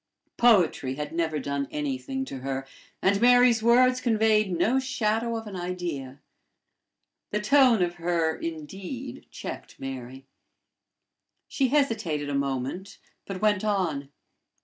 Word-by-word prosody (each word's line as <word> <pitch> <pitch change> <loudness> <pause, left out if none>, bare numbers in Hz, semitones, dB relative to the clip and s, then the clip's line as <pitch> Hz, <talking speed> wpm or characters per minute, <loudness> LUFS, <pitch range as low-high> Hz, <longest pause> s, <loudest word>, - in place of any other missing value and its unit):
Poetry 180 - +3
had 150 +2 -5
never 165 -2 0
done 140 0 -2
anything 270 -2 -3
to 135 - -7
her, 135 0 -4 0.4
and 200 +2 +3
Mary's 245 -1 +6
words 250 +2 +4
conveyed 220 -4 +2
no 215 +10 +2
shadow 230 -3 -1
of 225 - -7
an 205 -2 -7
idea. 175 -7 -5 1.1
The 210 - -1
tone 240 -2 +5
of 175 0 -1
her 165 -2 +1
indeed 185 - -7
checked - - -8
Mary. 130 0 -7 1.2
She 270 - +1
hesitated 220 - 0
a - - -3
moment, 140 +7 -3 0.3
but 195 0 -6
went 210 -2 +3
on. 175 -10 -1
195 Hz, 125 wpm, -26 LUFS, 150-235 Hz, 1.2 s, Mary's